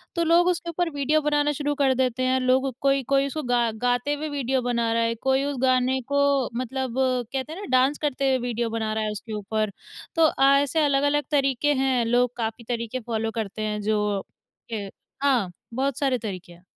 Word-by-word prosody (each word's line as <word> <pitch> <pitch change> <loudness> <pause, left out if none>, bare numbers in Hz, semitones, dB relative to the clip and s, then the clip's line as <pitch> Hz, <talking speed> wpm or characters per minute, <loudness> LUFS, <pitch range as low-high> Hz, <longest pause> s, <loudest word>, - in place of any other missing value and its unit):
तो 340 - +1
लोग 340 +2 +4
उसके 345 -1 0
ऊपर 345 +1 -1
वीडियो 290 +1 +1
बनाना 295 0 +1
शुरू 290 0 -2
कर 275 -2 +3
देते 255 -1 0
हैं। 255 0 +2
लोग 260 +1 +2
कोई 275 -1 +2
कोई 275 0 +3
उसको 305 +2 -4
गा 245 -2 +2 0.2
गाते 245 +4 +1
हुए 300 +1 -4
वीडियो 265 -2 -1
बना 235 -2 0
रहा 230 0 +2
है। 230 0 0
कोई 265 +3 +1
उस 285 -1 -3
गाने 255 0 +2
को 280 -2 +2
मतलब 255 +2 -2
कहते 260 +2 -1
हैं 350 - -8
ना 410 - -6
डाँस 260 +3 +3
करते 275 -2 0
हुए 260 - +3
वीडियो 235 -1 -1
बना 220 -1 -2
रहा 220 0 -1
है 215 - -1
उसके 215 +2 -7
ऊपर। 215 0 -2 0.4
तो 330 -1 +5
अ, 280 -3 +1
ऐसे 285 +3 +1
अलग-अलग 285 +1 +2
तरीके 275 0 +2
हैं 260 -3 +1
लोग 245 +1 +2
काफ़ी 225 0 -3
तरीके 235 +1 -2
फॉलो 225 -1 -1
करते 215 -1 -4
हैं 210 -1 -2
जो 210 -1 0 0.5
के 230 - -3 0.5
हाँ 245 -10 +2 0.2
बहुत 265 +1 -1
सारे 270 -3 +1
तरीके 185 -6 -7
हैं। 175 +1 -20
260 Hz, 205 wpm, -25 LUFS, 230-280 Hz, 0.5 s, तो